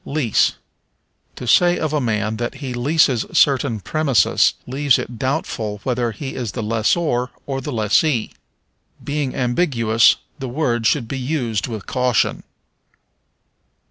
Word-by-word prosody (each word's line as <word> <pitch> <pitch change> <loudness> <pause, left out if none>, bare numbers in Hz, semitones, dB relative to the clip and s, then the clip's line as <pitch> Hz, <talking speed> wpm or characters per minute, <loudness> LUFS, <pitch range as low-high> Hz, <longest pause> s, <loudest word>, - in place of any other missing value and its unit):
Lease. 140 -7 +1 0.8
To - - -7
say 175 +8 +4
of 155 -1 -2
a 150 - +1
man 110 -2 -1
that 120 +3 -3
he 135 -2 -6
leases 130 -1 +2
certain 135 -5 +3
premises 140 - +2
leaves 135 0 +2
it 120 -2 -6
doubtful 115 -7 -2
whether 125 -2 0
he 135 +5 -6
is 120 -4 -5
lessor 120 +4 0 0.2
or 135 -1 -3
lessee. 120 +1 +1 0.7
Being 145 -2 -2
ambiguous, 120 -4 +3 0.2
the 135 -2 -5
word 120 -4 0
should 130 -7 +1
be 135 +3 -4
used 125 -6 -2
with 110 -5 -6
caution. 125 -3 0
125 Hz, 125 wpm, -20 LUFS, 115-145 Hz, 0.8 s, say